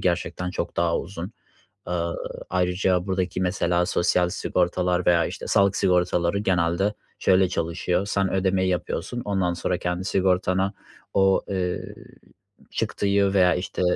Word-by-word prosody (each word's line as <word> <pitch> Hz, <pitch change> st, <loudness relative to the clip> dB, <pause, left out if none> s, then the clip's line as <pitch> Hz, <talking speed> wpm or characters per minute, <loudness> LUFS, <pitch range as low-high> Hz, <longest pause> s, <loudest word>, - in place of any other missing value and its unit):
gerçekten 90 Hz, 0 st, -1 dB
çok 85 Hz, -1 st, -4 dB
daha 85 Hz, -1 st, +2 dB
uzun. 95 Hz, +2 st, -6 dB, 0.5 s
Aaa, 85 Hz, -1 st, -2 dB, 0.4 s
ayrıca 90 Hz, 0 st, +1 dB
buradaki 95 Hz, -1 st, -1 dB
mesela 90 Hz, -1 st, +1 dB
sosyal 90 Hz, -1 st, +2 dB
sigortalar 90 Hz, 0 st, 0 dB
veya, 85 Hz, -1 st, +4 dB
işte, -, -, -6 dB
sağlık 100 Hz, 0 st, +3 dB
sigortaları 90 Hz, 0 st, +2 dB
genelde 95 Hz, +1 st, +1 dB, 0.2 s
şöyle 95 Hz, 0 st, +4 dB
çalışıyor: 90 Hz, +2 st, -1 dB
Sen 100 Hz, -1 st, 0 dB
ödemeyi 95 Hz, 0 st, +1 dB
yapıyorsun, 95 Hz, +6 st, -3 dB
ondan 95 Hz, -4 st, 0 dB
sonra 90 Hz, +1 st, -1 dB
kendi 90 Hz, +1 st, -2 dB
sigortanı 95 Hz, 0 st, +1 dB, 0.4 s
o, 95 Hz, -1 st, +4 dB
eee, 90 Hz, -2 st, -3 dB, 0.8 s
çıktıyı 100 Hz, -1 st, +1 dB
veya, 90 Hz, -2 st, +5 dB
işte, 90 Hz, 0 st, -3 dB
90 Hz, 125 wpm, -24 LUFS, 90-95 Hz, 0.8 s, veya